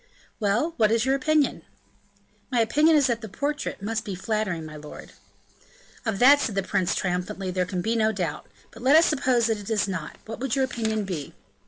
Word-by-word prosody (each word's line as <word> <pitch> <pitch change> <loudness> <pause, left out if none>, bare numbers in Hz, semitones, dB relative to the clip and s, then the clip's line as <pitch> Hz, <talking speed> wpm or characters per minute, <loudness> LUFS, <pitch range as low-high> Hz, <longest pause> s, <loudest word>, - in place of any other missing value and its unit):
"Well, 230 +10 +1
what 215 -3 +4
is 230 +1 +2
your 265 - +2
opinion?" 295 +2 +1 0.9
"My 250 -2 +1
opinion 300 +8 +4
is 290 -2 +4
that 235 -3 0
the 220 - -7
portrait 285 -2 -3
must 225 +2 -2
be 200 -5 -5
flattering, 190 -4 -2
my 155 -1 -9
lord." 150 0 -10 1.0
"Of 220 -3 0
that," 275 +6 +7
said 220 - -2
the 195 - 0
prince 185 -1 0
triumphantly, 185 +1 -2
"there 180 -1 -1
can 180 -2 -3
be 225 +1 0
no 220 -1 +2
doubt; 175 -7 -4 0.2
but 230 - -13
let 265 +4 +5
us 325 +1 +7
suppose 255 -5 +2
that 225 -2 0
it 205 - -8
is 215 -2 +1
not, 185 -6 -5
what 220 0 -7
would 265 0 -1
your 265 -1 +2
opinion 220 -4 -2
be?" 170 -7 -5
220 Hz, 205 wpm, -25 LUFS, 190-260 Hz, 1.0 s, that